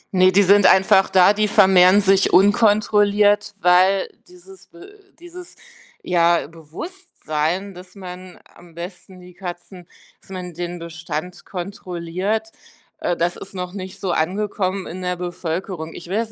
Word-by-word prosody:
Ne, 185 0 +5
die 200 +2 +4
sind 200 0 +5
einfach 190 0 +4
da, 185 +1 +5
die 210 0 0
vermehren 190 -1 +5
sich 195 -1 +3
unkontrolliert, 205 +1 +3
weil 185 +2 +3 0.2
dieses 360 +2 -17
Be 400 +4 -16 0.2
dieses, 350 +1 -12 0.5
ja, 170 -2 +2
Bewusstsein, 170 - -5
dass 180 +2 -14
man 185 -1 -10 0.2
am 170 -2 -18
besten 180 +1 -10
die 180 0 -15
Katzen 175 0 -9 0.3
dass - - -21
man 180 -2 -7
den 175 +1 -5
Bestand 165 +1 -7
kontrolliert, 185 +3 -4 0.5
äh, 175 - -2
das 175 +1 -1
ist 195 - -11
noch 180 0 -5
nicht 190 0 -8
so 190 - -2
angekommen 190 +2 -2
in 185 +2 -8
der 180 0 -2
Bevölkerung. 175 -1 -5
Ich 170 - -10
will 195 - -1
das 220 - -11
185 Hz, 145 wpm, -20 LUFS, 175-205 Hz, 0.5 s, Ne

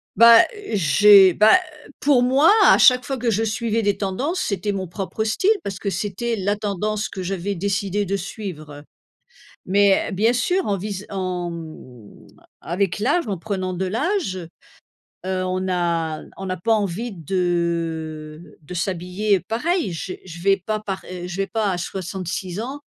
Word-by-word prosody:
Bah, 230 0 +8 0.3
j'ai 195 +1 +6
bah, 215 - +6 0.4
pour 275 -3 +3
moi, 270 +8 +5
à - - +7
chaque 250 -1 +6
fois 270 - -3
que 235 -1 0
je 215 - 0
suivais 225 +1 -1
des 205 -1 0
tendances, 265 - -2
c'était 200 - -2
mon 190 -2 -4
propre 195 +4 -4
style, 225 - +1
parce 195 -1 -5
que 200 - -2
c'était 210 +4 -2
la 205 0 -1
tendance 210 +1 -2
que 190 - -6
j'avais 195 +2 -3
décidé 200 +2 -1
de 200 +2 -1
suivre, 180 -6 -7
heu, 145 0 -11 0.8
mais 200 +1 +3
bien 220 +5 +2
sûr, 355 - 0
en 200 - +1
vis 200 +1 -6
en, 185 -3 -3
hem, 155 -10 -11 0.3
avec 185 +3 -2
l'âge, 285 +7 +1
en 200 - -2
prenant 185 0 -3
de 185 +1 -2
l'âge, 225 - -2 0.8
heu, 185 0 -1
on 185 0 -1
n'a 170 -4 -1
on 195 - -6
n'a 185 - -2
pas 225 +6 +1
envie 210 +2 -2
de 165 -3 -3
de 155 +4 -10
s'habiller, 185 +3 0
heu, - - -16
pareil. 245 - -1
J'ai 180 +2 -6
je 170 -2 -10
vais 195 +2 +4
pas 215 0 -1
par, 195 -3 -5
heu 180 -1 -6
je 175 - -6
vais 195 +1 -1
pas, 210 +1 -1
à 180 - -2
66 185 +1 -4
ans, 270 +5 -6
195 Hz, 170 wpm, -22 LUFS, 180-215 Hz, 0.8 s, Bah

